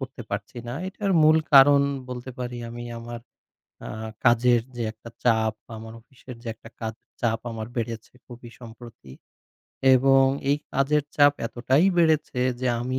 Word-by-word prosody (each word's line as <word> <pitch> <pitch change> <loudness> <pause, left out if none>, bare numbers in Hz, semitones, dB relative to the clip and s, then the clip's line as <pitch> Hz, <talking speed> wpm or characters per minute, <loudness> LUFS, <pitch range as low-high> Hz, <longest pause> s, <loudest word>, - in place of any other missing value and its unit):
করতে 135 -1 -7
পারছি 105 +4 -5
না। 120 - -4
এটার 195 0 -2
মূল 155 +1 +6 0.2
কারণ 140 +1 +8 0.3
বলতে 125 +1 -6
পারি 125 -1 -5
আমি 120 +1 -7
আমার 120 0 -8 0.7
আ - - -6 0.4
কাজের 120 0 +4
যে 120 - -4
একটা 115 +1 -13
চাপ, 110 -2 +2 0.2
আমার 110 +1 -10
অফিসের 125 +1 -13
যে - - -8
একটা 115 - -15
কাজ 110 0 -3 0.3
চাপ 115 -1 0
আমার 110 -1 -6
বেড়েছে 115 -2 -5
খুবই 120 -1 -12
সম্প্রতি 115 - -13 0.8
এবং 135 +1 +5 0.3
এই 145 - +3 0.2
কাজের 140 +2 +2
চাপ 145 -1 +6
এতটাই 130 +8 +1
বেড়েছে 155 -6 +2 0.2
যে 130 - -1
আমি 130 +2 -2
120 Hz, 155 wpm, -25 LUFS, 115-135 Hz, 0.8 s, কারণ